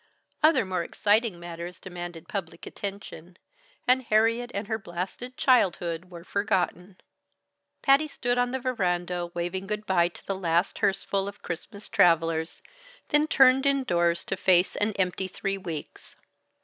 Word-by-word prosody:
Other 310 -8 +5
more 185 -2 -1
exciting 210 +1 +1
matters 175 +1 -7
demanded 175 -2 -8
public 200 -8 -5
attention; 190 -3 -8 0.5
and 255 +1 +5
Harriet 230 +1 +2
and 200 -1 -3
her 220 0 -2
blasted 195 +8 -6
childhood 180 -9 +2
were 170 -2 -10
forgotten. 185 -1 -1 0.9
Patty 275 +3 +5
stood 245 -4 -1
on 245 0 +2
the 260 - -2
veranda 180 -8 -1
waving 175 +3 -3
good 210 +1 -3
by 175 -4 +3
to 175 - -13
the 195 - -1
last 175 -1 0
hearseful 195 0 0
of 200 - -9
Christmas 180 +4 -7
travelers, 165 -1 +2 0.5
then 295 +1 +3
turned 270 -2 +5
indoors 175 -12 +1
to - - -2
face 180 -1 +3
an 210 +1 0
empty 190 -1 -1
three 195 +1 -3
weeks. 165 -5 -8
190 Hz, 140 wpm, -27 LUFS, 175-225 Hz, 0.9 s, Other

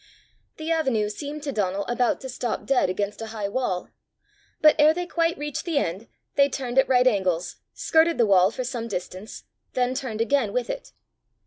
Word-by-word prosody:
The 315 +1 -3
avenue 260 -10 +1
seemed 290 +7 -6
to 290 - -2
Donal 200 -3 -1
about 240 0 0
to 265 - -6
stop 245 -2 -3
dead 270 -8 +2
against 200 +3 -3
a 225 - -4
high 215 -2 -4
wall, 200 -5 -2 0.7
but 305 0 +6
ere 305 +2 +6
they 355 0 -2
quite 335 -1 0
reached 295 -1 -4
the 335 -4 -1
end, 195 -2 -1 0.3
they 280 0 +4
turned 260 -1 0
at 265 - +3
right 250 -1 +4
angles, 185 -7 +1 0.2
skirted 325 +1 +3
the 235 - +4
wall 190 -2 +5
for 255 +4 -4
some 240 -2 -4
distance, 185 0 -6 0.3
then 250 0 +1
turned 255 -5 -4
again 230 -2 +1
with 250 -1 -1
it. - - -8
245 Hz, 190 wpm, -25 LUFS, 210-285 Hz, 0.7 s, but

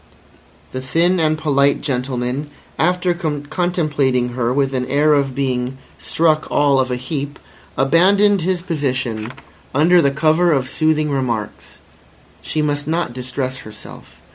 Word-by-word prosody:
The 130 - -4
thin 170 +7 +1
and 155 -1 +2
polite 140 -2 +2
gentleman, 125 +1 -3 0.3
after 180 +2 +2
contemplating 150 -5 -1
her 120 -1 -1
with 135 0 0
an 125 -1 -1
air 145 +3 +3
of 140 -3 +1
being 130 -1 -2 0.2
"struck 155 -2 +1
all 140 -2 +3
of 130 -1 +1
a 125 - -1
heap," 140 +2 -5 0.4
abandoned 190 +8 +4
his 180 0 -1
position 130 -9 -2 0.4
under 170 +5 +5
the 140 - +3
cover 160 +4 +2
of 130 -2 -1
soothing 155 -1 +1
remarks. 120 -6 -3 0.6
She 155 - -2
must 145 -1 -1
not 165 -5 -1
distress 130 +1 -4
herself. 105 -1 -12
145 Hz, 135 wpm, -19 LUFS, 130-160 Hz, 0.6 s, under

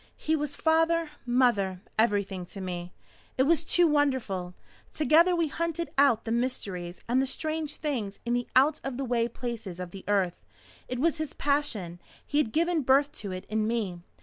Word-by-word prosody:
"He 315 - 0
was 295 -1 -3
father, 325 0 +2 0.2
mother 235 -7 +2 0.2
everything 205 -4 +1
to 195 - -10
me. 180 -2 -5 0.5
It 260 - +4
was 325 +3 +3
too 350 +2 +4
wonderful. 260 - 0 0.4
Together 325 +4 +4
we 335 -2 +1
hunted 335 +2 -3
out 270 -5 +4
the 225 - -3
mysteries 195 -8 -2
and 250 +3 +3
the 270 - 0
strange 310 +2 -2
things 240 -10 -3
in 235 - 0
the 245 0 0
out 285 +4 +4
of 270 -2 -4
the 275 - -2
way 235 -2 +1
places 230 -6 -6
of 180 -1 -6
the 195 0 -9
earth. 195 -4 0 0.4
It 250 - -3
was 320 +4 +1
his 310 -2 -3
passion. 235 - -1 0.3
He 290 - 0
had 275 -7 +1
given 335 +2 +1
birth 275 +2 +3
to 200 - -5
it 185 0 -6
in 215 0 0
me. 205 -7 -2
250 Hz, 180 wpm, -28 LUFS, 200-300 Hz, 0.5 s, It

